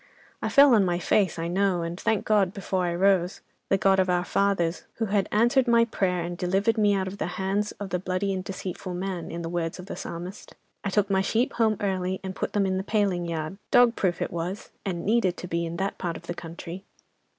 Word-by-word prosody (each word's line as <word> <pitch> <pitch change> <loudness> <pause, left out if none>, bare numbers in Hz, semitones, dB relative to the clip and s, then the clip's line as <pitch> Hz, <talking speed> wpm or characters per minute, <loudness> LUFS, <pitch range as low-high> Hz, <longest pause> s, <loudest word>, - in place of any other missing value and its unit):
I - - -1
fell 280 -2 +7
on 215 -3 +5
my 175 -2 +1
face, 185 +1 +2
I 165 0 -2
know, 185 -1 +1
and 170 +2 -5
thanked 220 -2 0
God 200 -4 +2
before 190 -2 -1
I 170 - -1
rose—the 190 +1 +1
God 195 0 +3
of 185 -1 +2
our 180 0 +2
fathers, 185 -4 0
who 225 - -1
had 200 -1 0
answered 240 +4 +3
my 235 0 +5
prayer 180 -6 0
and 175 +1 -4
delivered 195 +5 +1
me 205 -1 +4
out 190 -1 0
of 195 +2 -7
the - - -1
hand 195 +2 0
of 200 -1 -6
the 180 - 0
"bloody 185 +2 -1
and 185 -1 -3
deceitful 185 -1 -5
man," 185 -1 -4
in 170 0 -5
the - - -3
words 165 -1 -2
of 180 - -9
the - - -6
Psalmist. 175 +4 -7 0.3
I 200 - -1
took 200 0 +1
my 190 -1 +3
sheep 230 +5 +1
home 220 -3 +2
early, 190 -2 -1
and 190 0 -5
put - - -3
them 205 -1 +2
in 190 0 0
the 190 - -2
paling 195 -5 0
yard—dog 195 - +2
proof 175 -3 0
it - - -4
was—and 175 +1 -5
needed 200 -4 +2
to 180 - -6
be, 170 0 -1
in 165 +1 -5
that 195 +2 -2
part 170 -3 -2
of - - -14
the 175 - -3
country. 170 +2 -8
190 Hz, 230 wpm, -26 LUFS, 175-200 Hz, 0.3 s, fell